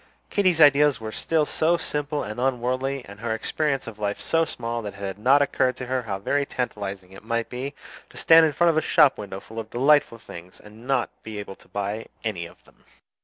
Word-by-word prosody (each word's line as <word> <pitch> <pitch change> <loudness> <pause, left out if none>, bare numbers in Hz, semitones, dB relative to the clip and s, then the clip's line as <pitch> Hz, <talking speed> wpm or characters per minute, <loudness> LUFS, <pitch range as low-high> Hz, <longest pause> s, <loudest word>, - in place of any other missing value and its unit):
Katy's 185 -5 +2
ideas 145 -2 +6
were 110 -1 -6
still 155 +6 0
so 165 +3 +1
simple 150 -2 -2
and 105 +3 -6
unworldly, 130 +1 -1
and 100 +1 -12
her 110 0 -2
experience 140 +4 -1
of 110 -2 -9
life 100 -1 -2
so 165 0 +1
small, 120 -5 -4
that 105 -2 -7
it - - -13
had 100 0 -5
not 135 +6 +5
occurred 130 -2 +1
to 130 - -6
her 130 +1 -1
how 105 -5 -4
very 140 +9 0
tantalizing 100 -8 -5
it 95 - -13
might 115 +1 -2
be 135 +3 -5 0.3
to - - -14
stand 160 0 +7
in - - -1
front 170 +2 +3
of 155 - +2
shop 150 -4 +4
windows 100 -2 -7
full 110 +1 -8
of 110 -1 -7
delightful 135 0 +3
things 90 -4 -12
and 110 +4 -14
not 135 -3 +1
be 110 -1 -8
able 100 -1 -6
to - - -22
buy 100 +2 -4 0.2
any 90 -7 -3
of 85 +1 -20
them. - - -24
120 Hz, 220 wpm, -24 LUFS, 105-145 Hz, 0.3 s, stand